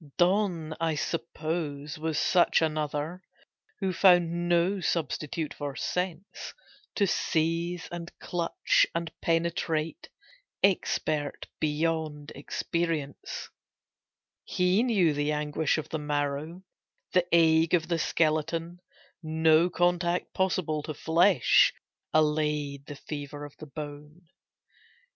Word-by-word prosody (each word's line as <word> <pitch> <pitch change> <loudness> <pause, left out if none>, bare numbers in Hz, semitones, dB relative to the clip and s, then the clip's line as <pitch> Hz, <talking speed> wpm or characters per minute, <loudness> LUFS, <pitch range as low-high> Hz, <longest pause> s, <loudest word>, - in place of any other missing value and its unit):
Donne, 175 -3 +2
I 165 -1 0
suppose, 155 -2 -3
was 160 -1 -2
such 175 +2 +4
another 155 +2 -2 0.6
Who 190 -1 0
found 175 -2 +4
no 175 +3 +2
substitute 160 -2 -2
for 145 -2 -5
sense; 180 - -4 0.4
To 205 - +3
seize 170 0 0
and 175 0 -6
clutch 170 -1 +1
and 165 -1 -2
penetrate, 165 - -1 0.5
Expert 155 -6 0
beyond 155 -1 -1
experience, 155 0 -3 0.9
He 180 +3 +2
knew 200 -10 +3
the 145 +1 0
anguish 150 0 0
of 155 - -5
the 160 - -3
marrow 150 +4 -2 0.5
The 180 -1 +3
ague 165 0 +5
of 165 -2 -1
the 170 -1 0
skeleton; 165 +2 0 0.4
No 160 +1 +3
contact 175 0 0
possible 180 -5 0
to 155 0 -6
flesh 165 - +4 0.4
Allayed 150 -2 +1
the 145 - -7
fever 145 0 -7
of 145 - -12
the 155 - -10
bone. 150 +3 -9
160 Hz, 105 wpm, -28 LUFS, 150-175 Hz, 0.9 s, ague